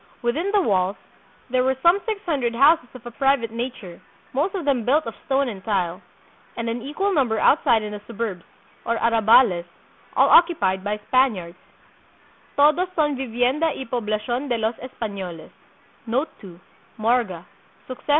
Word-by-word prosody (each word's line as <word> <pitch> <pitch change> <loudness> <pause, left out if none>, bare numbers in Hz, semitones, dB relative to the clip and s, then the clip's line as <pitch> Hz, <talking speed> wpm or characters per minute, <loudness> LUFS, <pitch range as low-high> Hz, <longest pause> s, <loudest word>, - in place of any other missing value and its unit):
Within 310 +12 0
the 410 - +4
walls, 190 - +1 0.6
there 255 0 +2
were 265 +1 +1
some 345 +4 +5
six 435 -2 -1
hundred 270 -9 -1
houses 290 +2 +4
of 250 -1 -12
a 240 - -7
private 270 -2 +1
nature, 230 -7 -6 0.3
most 310 +9 0
of 360 -6 -4
them 270 -5 +1
built 295 +5 +2
of 230 - -5
stone 275 0 +1
and 195 -4 -8
tile, 185 -3 -1 0.6
and 230 0 -3
an 235 +1 -3
equal 305 +10 -2
number 250 -8 +1
outside 235 -7 +3
in 210 - -5
the 210 0 -7
suburbs, 210 -6 -4 0.4
or 230 -1 0
"arrabales," 225 -5 +4 0.5
all - - +6
occupied 205 - +4
by 210 +1 -2
Spaniards 205 -10 +1 1.0
("todos 305 +6 +4
son 295 -3 +1
vivienda 255 +4 0
y 265 - -6
pob 235 -3 -4
lacion 240 +6 -2
de 240 - +1
los 220 +1 0
Espanoles"). 200 -9 -7
240 Hz, 145 wpm, -23 LUFS, 215-280 Hz, 1.0 s, all